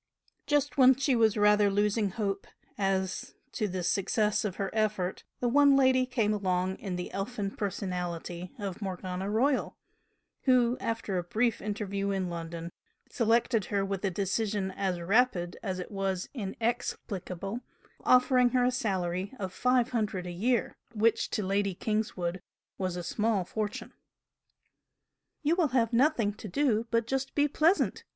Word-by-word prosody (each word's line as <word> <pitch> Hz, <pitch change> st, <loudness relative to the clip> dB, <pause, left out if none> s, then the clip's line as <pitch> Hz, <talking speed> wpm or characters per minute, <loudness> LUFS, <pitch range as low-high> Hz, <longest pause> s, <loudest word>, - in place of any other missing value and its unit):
Just 290 Hz, -1 st, +1 dB
when 260 Hz, 0 st, +8 dB
she 270 Hz, 0 st, +1 dB
was 225 Hz, -2 st, +3 dB
rather 210 Hz, 0 st, +5 dB
losing 205 Hz, +1 st, +1 dB
hope 200 Hz, 0 st, -3 dB, 0.3 s
as 190 Hz, -2 st, -1 dB, 0.2 s
to 215 Hz, -, -1 dB
the 185 Hz, -1 st, -3 dB
success 210 Hz, +3 st, +1 dB
of 200 Hz, -4 st, -2 dB
her 195 Hz, -1 st, -3 dB
effort, 210 Hz, -4 st, -1 dB, 0.2 s
the 245 Hz, -, +2 dB
"one 280 Hz, +3 st, +5 dB
lady" 260 Hz, -1 st, +4 dB
came 230 Hz, -4 st, +1 dB
along 185 Hz, -2 st, 0 dB
in 190 Hz, -3 st, -4 dB
the 180 Hz, 0 st, -5 dB
elfin 200 Hz, 0 st, -3 dB
personality 180 Hz, -3 st, -4 dB
of 200 Hz, -2 st, -5 dB
Morgana 185 Hz, 0 st, -4 dB
Royal, 255 Hz, +6 st, +1 dB, 0.7 s
who, 250 Hz, -2 st, +4 dB
after 220 Hz, -5 st, -2 dB
a -, -, -3 dB
brief 220 Hz, +6 st, 0 dB
interview 200 Hz, -1 st, -2 dB
in 190 Hz, -2 st, -1 dB
London, 170 Hz, 0 st, -6 dB, 0.4 s
selected 230 Hz, -1 st, +2 dB
her 200 Hz, -2 st, 0 dB
with 195 Hz, 0 st, -3 dB
a 195 Hz, -, +2 dB
decision 195 Hz, +1 st, -1 dB
as 185 Hz, -2 st, -2 dB
rapid 180 Hz, -2 st, +2 dB
as 190 Hz, -4 st, -3 dB
it 180 Hz, -, -6 dB
was 195 Hz, -2 st, -2 dB
inexplicable, 200 Hz, -3 st, -3 dB, 0.4 s
offering 250 Hz, 0 st, +5 dB
her 245 Hz, -, +3 dB
a 250 Hz, -, +3 dB
salary 190 Hz, -5 st, -1 dB
of 190 Hz, -3 st, -5 dB
five 250 Hz, +1 st, +2 dB
hundred 210 Hz, -6 st, -1 dB
a 180 Hz, -, -5 dB
year, 230 Hz, +7 st, 0 dB, 0.2 s
which 220 Hz, +1 st, +2 dB
to 210 Hz, -, -1 dB
Lady 195 Hz, 0 st, 0 dB
Kingswood 190 Hz, -4 st, -2 dB, 0.4 s
was 185 Hz, -2 st, -1 dB
a 175 Hz, -, -4 dB
small 210 Hz, +1 st, 0 dB
fortune. 210 Hz, +2 st, -4 dB, 1.5 s
"You 300 Hz, +3 st, +3 dB
will 345 Hz, -4 st, +3 dB
have 230 Hz, -1 st, +2 dB
nothing 235 Hz, -5 st, +3 dB
to 215 Hz, -, -9 dB
do 235 Hz, +1 st, +1 dB
but 230 Hz, -1 st, +1 dB
just 270 Hz, +2 st, -2 dB
be 290 Hz, 0 st, +4 dB
pleasant!" 320 Hz, +6 st, +2 dB
205 Hz, 150 wpm, -29 LUFS, 190-235 Hz, 1.5 s, when